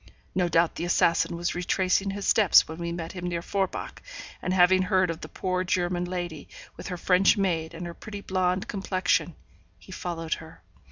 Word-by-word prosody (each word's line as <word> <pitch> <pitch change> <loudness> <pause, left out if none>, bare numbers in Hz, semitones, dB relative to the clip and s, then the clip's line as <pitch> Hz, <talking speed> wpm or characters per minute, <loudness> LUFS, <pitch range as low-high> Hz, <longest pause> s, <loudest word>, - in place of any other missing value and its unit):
No 180 -2 +1
doubt 165 0 +3
the - - -5
assassin 170 -1 +2
was 170 0 -2
retracing 185 +2 +1
his 200 0 -4
steps 210 -6 +6
when 160 +2 -8
we 170 0 -3
met 170 -1 -5
him 180 -1 -5
near 170 -1 -3
Forbach, 195 0 -3 0.4
and 185 - -2
having 185 0 +5
heard 185 -2 +2
of 165 - -7
the - - -8
poor 185 -1 -2
German 175 -1 0
lady, 175 -4 -5 0.3
with - - -8
her 180 - -4
French 185 +4 +4
maid, 170 -4 -1
and 175 +1 -6
her 170 - -6
pretty 205 +3 -8
blonde 185 -1 0
complexion, 185 -4 0 0.4
he 85 - -15
followed 165 -2 -3
her. 160 0 -14
180 Hz, 185 wpm, -27 LUFS, 170-185 Hz, 0.4 s, steps